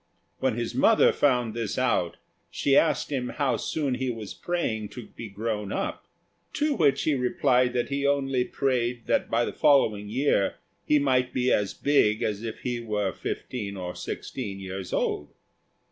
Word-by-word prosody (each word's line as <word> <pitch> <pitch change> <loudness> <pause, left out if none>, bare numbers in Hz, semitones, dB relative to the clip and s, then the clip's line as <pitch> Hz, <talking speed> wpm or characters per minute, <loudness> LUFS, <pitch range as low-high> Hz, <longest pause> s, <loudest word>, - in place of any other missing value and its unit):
When - - +1
his - - -3
mother - - +5
found 125 -5 +2
this 115 -3 -3
out, 115 -9 +1 0.3
she 140 - +1
asked 155 -1 +3
him 125 -3 -1
how 135 -5 0
soon 145 -5 -1
he 130 +1 -2
was 110 -4 -5
praying 110 -12 -2
to 125 -3 -8
be 115 - -9
grown 105 0 -3
up; - - -3 0.5
to 300 +1 +1
which 150 - +2
he 155 - +2
replied 125 -1 +2
that 120 -1 -1
he 140 0 -1
only 135 -3 +1
prayed 125 -3 -1
that - - +1
by 120 +1 +2
the - - -4
following 110 -8 +3
year 125 -4 +1 0.3
he 150 - +5
might 130 -3 +1
be 125 0 +2
as 100 -1 0
big 110 -7 +2
as 105 -1 -1
if 115 -1 -6
he 120 -1 -2
were 105 -5 -1
fifteen 100 -6 -5
or 90 -1 -4
sixteen 100 +2 -5
years 95 -1 -6
old. 75 - -2
125 Hz, 170 wpm, -26 LUFS, 105-135 Hz, 0.5 s, mother